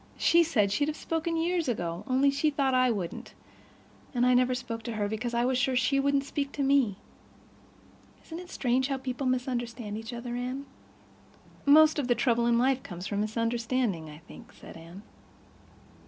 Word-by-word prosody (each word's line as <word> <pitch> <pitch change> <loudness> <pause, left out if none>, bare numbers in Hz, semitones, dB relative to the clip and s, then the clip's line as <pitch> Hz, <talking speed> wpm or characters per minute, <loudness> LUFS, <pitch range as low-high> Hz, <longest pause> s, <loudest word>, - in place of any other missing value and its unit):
She 340 - +4
said 230 -12 +2
she'd 285 +8 +1
have 310 - -3
spoken 330 0 -2
years 340 0 0
ago, 175 -6 -3
only 270 +2 +3
she 280 +3 +1
thought 275 -2 0
I 255 0 +4
wouldn't. 195 -7 -4 0.8
And 245 0 +3
I 250 - +4
never 250 0 +3
spoke 240 -2 -5
to 235 - -3
her 210 -2 -1
because 235 +3 -3
I 240 +1 +2
was 255 0 +1
sure 265 0 +1
she 275 +2 +2
wouldn't 280 0 +2
speak 280 0 -3
to 285 - -2
me. 270 -7 +3 1.3
Isn't 325 +1 -7
it 360 0 -10
strange 255 -3 0
how 275 -1 -1
people 260 0 -4
misunderstand 240 -4 -2
each 225 +2 -8
other, 240 0 -5
Anne?" 255 +3 -4 1.0
"Most 310 +1 +6
of 270 - -1
the 245 - +3
trouble 235 0 +1
in 235 0 +3
life 260 +2 +2
comes 180 0 -8
from 205 +1 -2
misunderstanding, 230 -5 -1
I 150 - -11
think," - - -13
said - - -13
Anne. 165 +4 -12
250 Hz, 185 wpm, -28 LUFS, 230-275 Hz, 1.3 s, Most